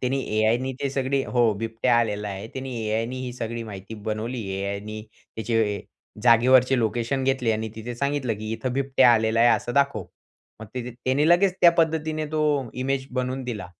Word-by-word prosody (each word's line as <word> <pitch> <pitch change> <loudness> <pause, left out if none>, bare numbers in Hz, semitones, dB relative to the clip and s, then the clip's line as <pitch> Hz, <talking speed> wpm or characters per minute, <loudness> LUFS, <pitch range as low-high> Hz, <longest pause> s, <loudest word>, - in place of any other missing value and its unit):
त्याने 130 +2 0
AIनी 115 +4 0
ते 140 - 0
सगळी 135 0 0
हो, 120 -3 +2
बिबट्या 115 +2 +1
आलेला 105 -3 -1
आहे. 100 +2 -6
त्यानी 130 0 -6
AIनी 115 +4 -1
ही 125 -1 -5
सगळी 115 -1 -4
माहिती 100 -1 -8
बनवली. 110 +3 -4 0.2
AIनी 100 +2 -4
त्याचे 110 -2 -2 0.4
जागेवरचे 125 +2 +5
लोकेशन 120 +4 -1
घेतले 130 -4 +1
आणि 110 +1 -2
तिथे 115 +2 -6
सांगितलं 140 -2 -1
की 110 0 -5
"इथं 120 +3 -3
बिबट्या 130 -2 +4
आलेला 110 0 +2
आहे 120 - +6
असं 120 - -5
दाखव." 140 -9 +1 0.6
मग 110 - -8
तिथे 125 0 -4
त्याने 130 +6 0
लगेच 180 +2 +4
त्या 170 - +8
पद्धतीने 160 -2 0
तो 150 -5 +1
इमेज 135 +1 -2
बनवून 130 +1 -2
दिला. 105 -7 -5
120 Hz, 170 wpm, -24 LUFS, 110-135 Hz, 0.6 s, त्या